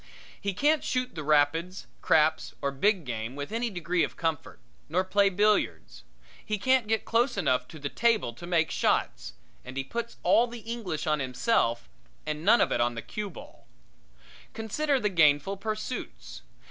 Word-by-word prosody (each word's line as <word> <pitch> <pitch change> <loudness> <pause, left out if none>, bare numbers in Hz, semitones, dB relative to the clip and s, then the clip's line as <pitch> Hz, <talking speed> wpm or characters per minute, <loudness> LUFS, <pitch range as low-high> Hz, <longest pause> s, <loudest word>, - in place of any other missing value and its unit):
He 200 -2 -2
can't 295 +6 +2
shoot 255 0 -1
rapids, 155 +4 +1 0.2
craps 155 0 +2
or 140 - -1
big 185 +5 +1
game 115 0 -4
with 145 +4 -6
any 235 +2 -1
degree 175 -2 -1
of - - -3
comfort; 160 -3 -3 0.3
nor 180 +4 +1
play 200 +1 +3
billiards. 210 +2 0 0.4
He 215 - -2
can't 260 +2 +2
get 220 0 0
close 235 +1 +1
enough 125 -9 +1
to 160 - -11
the 145 -1 -4
table 225 - +1
to 175 +9 -10
make 165 -2 +2
the - - -5
shots, - - 0 0.3
and 130 +1 -9
he 135 - -1
puts 235 +11 -5
all 240 - +4
the 235 -1 -9
English 225 -9 -4
on 155 -1 +1
himself 125 - 0 0.4
and 155 0 -4
none 215 +6 +5
of - - +2
it 120 - +1
on 120 0 +1
the 115 - -6
cue 210 -1 -5
ball. 170 - -13 0.9
Consider 270 +6 0
the 210 - 0
gainful 165 +1 +3
pursuits. 215 +4 -5
180 Hz, 170 wpm, -28 LUFS, 145-220 Hz, 0.9 s, none